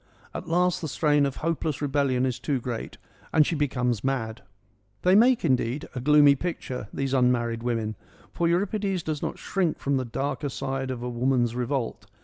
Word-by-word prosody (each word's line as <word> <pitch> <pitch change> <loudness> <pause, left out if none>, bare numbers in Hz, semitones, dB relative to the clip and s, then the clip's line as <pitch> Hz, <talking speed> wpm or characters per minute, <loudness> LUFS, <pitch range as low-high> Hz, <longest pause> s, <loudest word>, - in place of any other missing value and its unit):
At - - -6
last 180 +1 +2
the 160 - -3
strain 145 -1 +2
of 135 - -5
hopeless 160 -3 -1
rebellion 140 -3 +1
is 125 -3 -2
too 140 -4 -1
great, 120 -1 -5 0.3
and 155 -2 +5
she - - -1
becomes 125 -7 0
mad. 120 -5 -2 0.6
They 180 - +5
make, 235 +1 +5
indeed, 130 -1 0
a 130 - -4
gloomy 145 +2 +6
picture, 130 -7 -4
these 135 -1 -2
un 125 -2 +4
married 115 -1 -1
women, 115 -3 -2 0.4
for 170 - +1
Euripides 195 +1 0
does 155 -2 -3
not - - -3
shrink 180 -5 -1
from 140 0 0
the 130 - 0
darker 140 +4 -2
side 135 0 -3
of 125 -2 -4
a - - -3
woman's 120 -1 +1
revolt. 125 0 -2
135 Hz, 180 wpm, -26 LUFS, 125-155 Hz, 0.6 s, gloomy